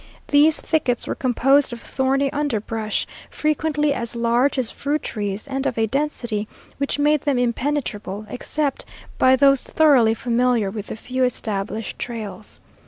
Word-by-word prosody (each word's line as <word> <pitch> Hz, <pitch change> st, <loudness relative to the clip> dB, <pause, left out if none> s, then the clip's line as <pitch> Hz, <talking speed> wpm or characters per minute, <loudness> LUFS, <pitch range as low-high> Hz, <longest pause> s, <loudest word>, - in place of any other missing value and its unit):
These 300 Hz, +2 st, +5 dB
thickets 260 Hz, -7 st, 0 dB
were -, -, -2 dB
composed 270 Hz, +2 st, +2 dB
of 240 Hz, -, -6 dB
thorny 270 Hz, +3 st, 0 dB
underbrush, 225 Hz, -7 st, -2 dB, 0.2 s
frequently 300 Hz, -1 st, 0 dB
as 235 Hz, -2 st, -2 dB
large 235 Hz, +4 st, +2 dB
as 250 Hz, -4 st, -1 dB
fruit 290 Hz, +2 st, -2 dB
trees 205 Hz, +1 st, -4 dB
and 270 Hz, 0 st, -2 dB
of 245 Hz, -, -3 dB
a 225 Hz, -, +3 dB
density 240 Hz, -4 st, -2 dB, 0.3 s
which 280 Hz, +1 st, -1 dB
made 295 Hz, 0 st, +3 dB
them 285 Hz, -3 st, 0 dB
impenetrable, 235 Hz, -5 st, -2 dB
except 285 Hz, +4 st, -2 dB, 0.4 s
by 260 Hz, 0 st, +6 dB
those 275 Hz, 0 st, +4 dB
thoroughly 260 Hz, -8 st, +4 dB
familiar 235 Hz, -3 st, +1 dB
with 210 Hz, -1 st, -6 dB
the -, -, -5 dB
few 255 Hz, +3 st, -2 dB
established 215 Hz, -3 st, -3 dB
trails. 220 Hz, -3 st, -7 dB
250 Hz, 145 wpm, -22 LUFS, 225-285 Hz, 0.4 s, by